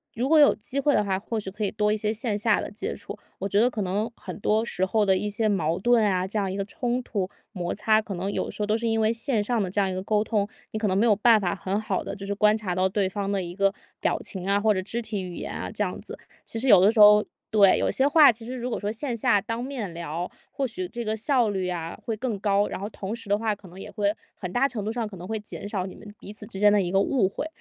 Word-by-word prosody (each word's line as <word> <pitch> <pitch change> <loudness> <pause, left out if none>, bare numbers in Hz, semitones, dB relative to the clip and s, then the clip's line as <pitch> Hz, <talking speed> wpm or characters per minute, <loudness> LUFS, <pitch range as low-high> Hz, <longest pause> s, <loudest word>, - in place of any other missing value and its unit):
如 245 +3 -1
果 315 +2 +5
有 290 - +6
机 255 +6 -4
会 285 +1 +3
的 - - +3
话， 190 -2 -1
或 225 +2 -3
许 195 -2 -6
可 210 +2 -5
以 200 - +1
多 210 +1 +1
一 - - 0
些 210 0 -1
线 220 -1 -2
下 210 0 +2
的 - - -5
接 210 - -4
触。 - - -8 0.2
我 195 - -2
觉 200 +1 +2
得 240 +3 +4
可 220 -4 -3
能 200 +5 -1
很 - - -8
多 215 +2 +1
时 190 - -2
候 215 +1 +2
的 190 - +4
一 210 +3 -1
些 215 +2 0
矛 170 -5 +1
盾 235 +3 +3
啊， 185 -3 +1
这 210 +3 -2
样 195 -2 -1
一 190 - -4
个 195 - -2
冲 245 +4 -2
突、 195 -6 -2 0.2
摩 180 -5 -3
擦， 215 +1 +3
可 205 -3 -6
能 190 +3 -3
有 - - -1
的 - - -6
时 210 - -4
候 - - +1
都 210 +1 +1
是 230 +1 -1
因 225 0 +1
为 220 +1 +2
线 230 -2 0
上 235 0 0
的 185 - -1
这 195 - -1
样 195 - +2
一 185 - -3
个 185 - -3
沟 210 +2 +1
通， 210 -3 0 0.2
你 215 - -3
可 215 - 0
能 190 - +1
没 220 - +3
有 215 - +5
办 220 +2 +5
法 180 -4 -1
很 195 +1 -2
好 215 - -2
地 - - -5
就 195 - -8
是 200 - -2
观 210 +1 +3
察 195 -5 -3
到 185 +1 +1
对 195 0 0
方 200 +1 -3
的 195 -2 0
一 175 - -6
个， 195 +1 +2 0.3
表 - - +1
情 190 -1 -6
啊， 200 - +3
或 215 0 +3
者 185 - -1
肢 225 +5 -4
体 215 -3 -4
语 180 -2 -7
言 - - -5
啊， - - -4
这 - - -1
样 - - -4
子。 - - -9 0.3
其 - - -5
实 265 - -1
有 200 -6 +8
的 200 - +6
时 225 - -1
候 210 0 +8 0.3
对， 200 -3 +5
有 - - +1
些 265 - +2
话 295 -2 +7
其 225 +1 -9
实 255 +2 -5
如 245 0 -4
果 235 - -2
说 205 0 -2
线 240 +3 -3
下 205 -1 +3
当 230 +3 -4
面 250 -8 -4
聊， 170 +1 -4 0.2
或 270 -2 -1
许 360 +11 -5
这 240 -5 -5
个 215 - 0
效 235 0 +1
率 190 -2 -2
啊 170 -2 -4
会 225 - -2
更 230 -3 -2
高。 200 0 +2
然 - - -5
后 200 +2 -4
同 205 0 -5
时 230 -3 -11
的 205 - +3
话， 215 -1 -1
可 200 -2 -15
能 180 +2 -12
也 - - -8
会， 205 -2 0 0.2
很 180 -3 -6
大 265 +7 +3
程 230 -6 -5
度 215 - -2
上 230 -1 -2
可 210 - -10
能 175 - -8
会 220 +1 -2
减 205 -1 -8
少 195 -3 -2
你 190 - -8
们 205 -1 -12
彼 205 - -10
此 210 - -8
之 195 - -8
间 205 0 +6
的 205 - +4
一 175 -2 -2
个 195 - +3
误 205 -1 +2
会。 245 - -4
210 Hz, 335 characters per minute, -25 LUFS, 195-225 Hz, 0.3 s, 有